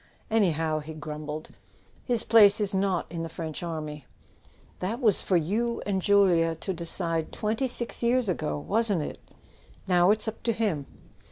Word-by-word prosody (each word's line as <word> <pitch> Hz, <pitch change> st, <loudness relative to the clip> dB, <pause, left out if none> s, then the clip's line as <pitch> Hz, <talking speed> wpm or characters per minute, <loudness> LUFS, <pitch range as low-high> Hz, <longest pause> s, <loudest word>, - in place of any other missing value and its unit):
"Anyhow," 165 Hz, -7 st, +2 dB
he 155 Hz, +1 st, -8 dB
grumbled, 150 Hz, 0 st, -6 dB, 0.5 s
"his 240 Hz, -3 st, +1 dB
place 210 Hz, -2 st, +6 dB
is 205 Hz, -1 st, 0 dB
not 190 Hz, -2 st, 0 dB
in 170 Hz, -1 st, -4 dB
the 165 Hz, -, -4 dB
French 160 Hz, -1 st, -6 dB
army." 155 Hz, -5 st, -5 dB, 0.7 s
"That 210 Hz, +7 st, -2 dB
was 220 Hz, -7 st, +3 dB
for 185 Hz, -, +2 dB
you 220 Hz, +9 st, -1 dB
and 195 Hz, -2 st, -1 dB
Julia 180 Hz, -5 st, +3 dB
to 190 Hz, +4 st, -4 dB
decide 165 Hz, -1 st, -1 dB
twenty 220 Hz, +5 st, -1 dB
six 240 Hz, -1 st, -3 dB
years 240 Hz, 0 st, +2 dB
ago, 160 Hz, -6 st, -1 dB
wasn't 205 Hz, +1 st, 0 dB
it? -, -, -6 dB, 0.7 s
Now 180 Hz, 0 st, +4 dB
it's 215 Hz, +2 st, +2 dB
up 220 Hz, -, -5 dB
to 230 Hz, -, 0 dB
him." 200 Hz, -11 st, -1 dB
185 Hz, 160 wpm, -27 LUFS, 160-215 Hz, 0.7 s, place